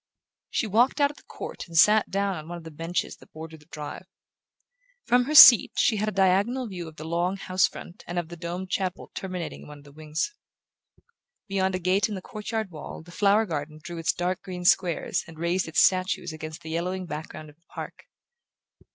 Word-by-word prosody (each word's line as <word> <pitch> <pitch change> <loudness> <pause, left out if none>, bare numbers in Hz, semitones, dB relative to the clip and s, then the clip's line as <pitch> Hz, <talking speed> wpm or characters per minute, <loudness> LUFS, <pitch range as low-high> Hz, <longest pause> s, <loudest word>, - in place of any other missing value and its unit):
She - - -1
walked 235 +8 +2
out 285 0 +3
of 295 - -19
the - - -16
court - - -7
and 165 -1 -5
sat 210 +5 +5
down 200 0 -1
on 155 -2 -8
one 175 0 -6
of 170 - -11
the 160 - -9
benches 165 +3 -3
that - - -19
bordered 160 0 -10
the 150 - -22
drive. 150 -3 -8 1.0
From 245 0 +3
her 305 +3 -2
seat 255 -5 +10
she 220 - +3
had 215 +1 0
a - - -5
diagonal 200 +7 +2
view 180 -5 -7
of 160 - -12
the 155 - -9
long 175 +4 -1
house 185 -1 +2
front 175 - -11
and 175 - -5
of 170 -2 -2
the 175 - -8
domed 175 +2 -6
chapel 185 -2 -3
terminating 185 -3 -6
one 150 0 -11
of 145 - -16
the 145 - -15
wings. 155 - -4 1.1
Beyond 190 -1 0
a - - -2
gate 190 +4 +1
in 210 - -4
the 190 - -6
court 210 -1 -8
yard 220 -4 -2
wall 155 0 -9
the 175 - -14
flower 205 +4 +3
garden 155 -3 -5
drew 170 +2 -8
its 165 - +1
dark 180 +1 -2
green 180 -1 -7
squares 175 -2 +2
and 165 -1 -12
raised 170 +2 0
its 160 - +3
statues 185 -3 +1
against 155 0 -8
the 160 - -7
yellowing 180 +3 -2
background 155 -1 -7
of 145 - -27
the 170 - -43
park. - - -9
180 Hz, 215 wpm, -26 LUFS, 160-195 Hz, 1.1 s, seat